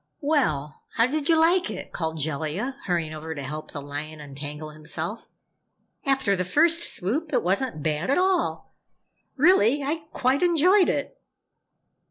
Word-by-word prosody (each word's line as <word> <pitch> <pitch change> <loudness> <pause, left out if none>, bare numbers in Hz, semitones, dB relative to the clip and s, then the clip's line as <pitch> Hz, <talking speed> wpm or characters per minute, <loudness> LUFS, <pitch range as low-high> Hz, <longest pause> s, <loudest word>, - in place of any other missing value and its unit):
"Well, 155 - 0
how 230 - +4
did 295 +3 -1
you 325 -1 +5
like 345 +3 +3
it?" 210 - -7
called 160 -1 -3
Jellia, 155 - -2
hurrying 170 -4 -1
over 160 +1 -6
to 145 - -5
help 150 +3 -6
the 145 - -6
lion 145 +2 -6
untangle 145 +1 -7
himself. 160 +7 -4 0.8
"After 265 -7 +2
the 180 - -1
first 330 - +3
swoop, 295 - -1
it - - +1
wasn't 190 - 0
bad 155 +6 -1
at 280 - +3
all. 370 -1 0 0.6
Really, 290 - +4
I 310 +3 -2
quite 260 +2 +1
enjoyed 355 +2 +4
it!" - - -3
200 Hz, 150 wpm, -25 LUFS, -, 0.8 s, you